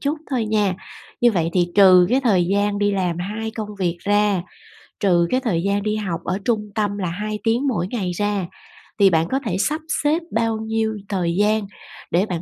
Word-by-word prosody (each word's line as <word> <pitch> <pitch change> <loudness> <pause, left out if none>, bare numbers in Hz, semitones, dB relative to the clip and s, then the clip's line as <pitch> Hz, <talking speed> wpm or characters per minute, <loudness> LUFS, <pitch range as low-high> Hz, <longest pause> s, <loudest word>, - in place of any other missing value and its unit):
chút 295 +2 -1
thôi 250 -4 0
nha! 210 -3 +1 0.5
Như 240 -1 +5
vậy 165 -4 0
thì 175 -1 +3
trừ 185 -3 +7
cái 260 - +3
thời 205 -9 +3
gian 200 +1 +1
đi 205 0 +1
làm 180 -3 -1
hai 215 +5 -4
công 215 -2 -6
việc 175 -2 0
ra, 205 -2 +2 0.6
trừ 175 -4 +3
cái 255 - +3
thời 180 -9 -1
gian 200 +1 0
đi 215 0 0
học 180 -6 -3
ở 185 - -1
trung 215 -3 0
tâm 205 -2 -1
là 180 -4 -2
2 210 +4 -4
tiếng 240 +5 +1
mỗi 180 -8 0
ngày 195 -5 -3
ra, 205 -1 -1 0.5
thì 195 -1 +7
bạn 165 -1 +2
có 270 - +1
thể 180 - -1
sắp 305 +9 0 0.2
xếp 300 +3 +2
bao 225 0 0
nhiêu 220 0 -2
thời 175 -4 -1
gian 210 0 +2 0.5
để 180 +4 +2
bạn 175 -5 -4
205 Hz, 210 wpm, -21 LUFS, 180-220 Hz, 0.6 s, trừ